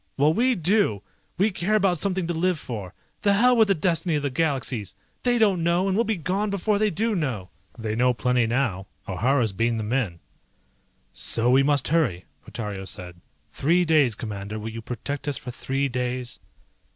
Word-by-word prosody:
Well 150 Hz, +3 st, +4 dB
we 250 Hz, +6 st, +2 dB
do! 175 Hz, -, +1 dB, 0.3 s
We 200 Hz, +4 st, +2 dB
care 190 Hz, +3 st, 0 dB
about 190 Hz, -5 st, +2 dB
something 190 Hz, 0 st, 0 dB
to 170 Hz, -, -2 dB
live 175 Hz, +1 st, +1 dB
for. 105 Hz, -10 st, -7 dB, 0.3 s
The 200 Hz, -, +3 dB
hell 245 Hz, +5 st, +5 dB
with 220 Hz, -2 st, +5 dB
the 195 Hz, -, +3 dB
destiny 165 Hz, 0 st, 0 dB
of 145 Hz, -, -1 dB
the 140 Hz, -, -1 dB
Galaxies! 130 Hz, -, -1 dB, 0.3 s
They 245 Hz, -1 st, +2 dB
don't 200 Hz, -6 st, +3 dB
know, 170 Hz, +3 st, +2 dB
and 190 Hz, -, +1 dB
we'll 230 Hz, +3 st, +2 dB
be 220 Hz, 0 st, 0 dB
gone 190 Hz, +5 st, -1 dB
before 200 Hz, +1 st, 0 dB
they 215 Hz, 0 st, +3 dB
do 220 Hz, +5 st, 0 dB
know." 125 Hz, -, -2 dB, 0.3 s
"They 110 Hz, -2 st, -3 dB
know 125 Hz, +2 st, +3 dB
plenty 125 Hz, 0 st, +1 dB
now. 115 Hz, -6 st, -1 dB, 0.2 s
O'Hara's 115 Hz, +3 st, +1 dB
beamed 115 Hz, +3 st, 0 dB
them 110 Hz, +2 st, -3 dB
in." 105 Hz, -11 st, -1 dB, 0.9 s
"So 120 Hz, +2 st, +1 dB
we 135 Hz, +2 st, +6 dB
must 140 Hz, -2 st, +2 dB
hurry," 125 Hz, -, +1 dB, 0.2 s
Portario 105 Hz, -4 st, -6 dB
said. 90 Hz, -1 st, -8 dB, 0.3 s
"Three 175 Hz, +5 st, +2 dB
days, 150 Hz, -8 st, +3 dB
Commander, 105 Hz, -1 st, -6 dB
will 110 Hz, +1 st, -5 dB
you 115 Hz, +1 st, -7 dB
protect 125 Hz, +5 st, -5 dB
us 145 Hz, -3 st, +1 dB
for 125 Hz, 0 st, -7 dB
three 135 Hz, +3 st, -2 dB
days?" 125 Hz, -1 st, -3 dB
140 Hz, 190 wpm, -25 LUFS, 115-185 Hz, 0.9 s, we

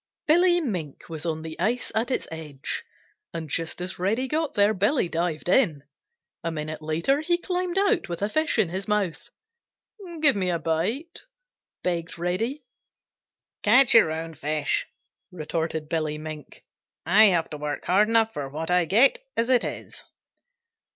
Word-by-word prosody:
Billy 350 Hz, +3 st, +4 dB
Mink 180 Hz, -, -5 dB
was 160 Hz, 0 st, -5 dB
on 160 Hz, -1 st, -2 dB
the 160 Hz, -1 st, -8 dB
ice 245 Hz, +3 st, -1 dB
at 225 Hz, +2 st, 0 dB
its 260 Hz, -, -1 dB
edge, 150 Hz, -4 st, -5 dB, 0.5 s
and 165 Hz, -1 st, -4 dB
just 165 Hz, +4 st, -3 dB
as 180 Hz, +1 st, -4 dB
Reddy 220 Hz, +8 st, 0 dB
got 310 Hz, +2 st, -1 dB
there 205 Hz, 0 st, +4 dB
Billy 205 Hz, +4 st, +1 dB
dived 170 Hz, -1 st, -2 dB
in. 175 Hz, -, +3 dB, 0.6 s
A 165 Hz, -, -1 dB
minute 155 Hz, 0 st, -5 dB
later 165 Hz, -, +1 dB
he 345 Hz, +2 st, +2 dB
climbed 360 Hz, 0 st, -2 dB
out 395 Hz, -, +2 dB
with 170 Hz, +3 st, -4 dB
a -, -, +2 dB
fish 310 Hz, +5 st, 0 dB
in 210 Hz, -7 st, +3 dB
his 190 Hz, +3 st, -4 dB
mouth. 195 Hz, -7 st, -1 dB, 0.9 s
"Give 295 Hz, -4 st, +6 dB
me 185 Hz, -2 st, 0 dB
a 175 Hz, -, +1 dB
bite," 180 Hz, -, -2 dB, 0.6 s
begged 170 Hz, -2 st, -2 dB
Reddy. 225 Hz, -, -2 dB, 1.0 s
"Catch 245 Hz, +5 st, +5 dB
your 225 Hz, -9 st, +6 dB
own 165 Hz, +1 st, -5 dB
fish," 150 Hz, 0 st, -1 dB, 0.4 s
retorted 160 Hz, -2 st, -3 dB
Billy 155 Hz, -2 st, -1 dB
Mink. 155 Hz, -1 st, -9 dB, 0.4 s
"I 215 Hz, +2 st, +7 dB
have 175 Hz, -5 st, +2 dB
to 150 Hz, -, -5 dB
work 150 Hz, 0 st, -4 dB
hard 205 Hz, +4 st, +3 dB
enough 225 Hz, -1 st, +3 dB
for 140 Hz, -2 st, -4 dB
what 160 Hz, +4 st, -4 dB
I 180 Hz, -1 st, +3 dB
get 275 Hz, -, +4 dB
as 230 Hz, +2 st, +1 dB
it 250 Hz, -, +4 dB
is." -, -, -7 dB
180 Hz, 160 wpm, -25 LUFS, 160-240 Hz, 1.0 s, I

